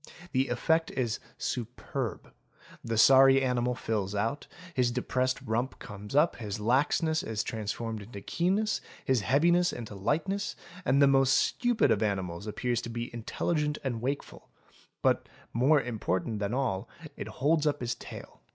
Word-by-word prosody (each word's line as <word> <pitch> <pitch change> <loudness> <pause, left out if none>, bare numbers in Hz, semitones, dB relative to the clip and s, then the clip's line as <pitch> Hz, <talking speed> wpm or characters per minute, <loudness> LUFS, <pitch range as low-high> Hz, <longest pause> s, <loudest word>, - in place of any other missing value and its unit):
'The 130 0 +2
effect 160 +7 +1
is 120 -3 -1 0.2
superb; 125 +1 -4 0.5
the 115 -1 -2
sorry 135 +3 +7
animal 125 -1 +1
fills 105 -4 -2
out, 115 +8 -1 0.3
his 125 -4 +2
depressed 130 +1 0
rump 120 +4 -1
comes 105 +4 -8
up, 150 +4 +4
his 105 -3 -4
laxness 145 +8 +2
is 110 -2 -2
transformed 110 0 -4
into 100 0 -9
keenness, 190 - 0 0.2
his 130 -4 +2
heaviness 170 - +3
into 115 -3 -7
lightness, 160 - -1
— 180 +2 -15
and 140 +2 +4
the - - +7
most 135 -1 +4
stupid 245 -2 +2
of - - +2
animals 95 -3 -2
appears 120 +2 -1
to - - -6
be 120 +1 -5
intelligent 150 +6 -1
and 120 -4 -2
wakeful: 140 +3 -4 0.5
but, - - +2 0.2
more 135 +6 +4
important 110 -4 -2
than 100 0 -1
all, 120 -7 -1 0.3
it - - -6
holds 155 +2 +1
up 145 -4 0
its 120 0 0
tail. - - -11
125 Hz, 150 wpm, -29 LUFS, 110-145 Hz, 0.5 s, sorry